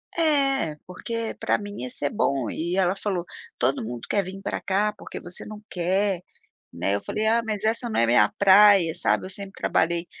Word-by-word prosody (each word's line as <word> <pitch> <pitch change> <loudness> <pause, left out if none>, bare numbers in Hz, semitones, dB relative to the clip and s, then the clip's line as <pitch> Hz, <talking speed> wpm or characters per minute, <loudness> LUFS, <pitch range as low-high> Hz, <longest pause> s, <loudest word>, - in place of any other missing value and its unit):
Eh, 275 - +1
porque 230 +5 -4
para - - +1
mim 205 0 -8
ia 125 - -4
ser 145 +3 -2
bom 135 -4 0
e 170 +3 -2
ela 185 0 +2
falou: 190 -3 -2 0.3
"Todo 125 +1 +1
mundo 120 +1 -6
quer 200 - +2
vim 190 +2 -8
para - - -3
cá, 205 +2 +1
porque - - -8
você 175 0 -7
não 215 0 -9
quer?", 185 +1 0 0.5
né, 95 +4 -1
eu 100 - -2
falei: 215 +1 -2
"Ah 230 +1 +3
mas 215 -2 -3
essa 230 +2 0
não - - +1
é 115 - +4
minha 120 +1 +4
praia, 200 -3 +7
sabe, - - 0
eu - - -8
sempre 195 0 -8
trabalhei, 170 +1 +1
195 Hz, 200 wpm, -25 LUFS, 170-210 Hz, 0.5 s, praia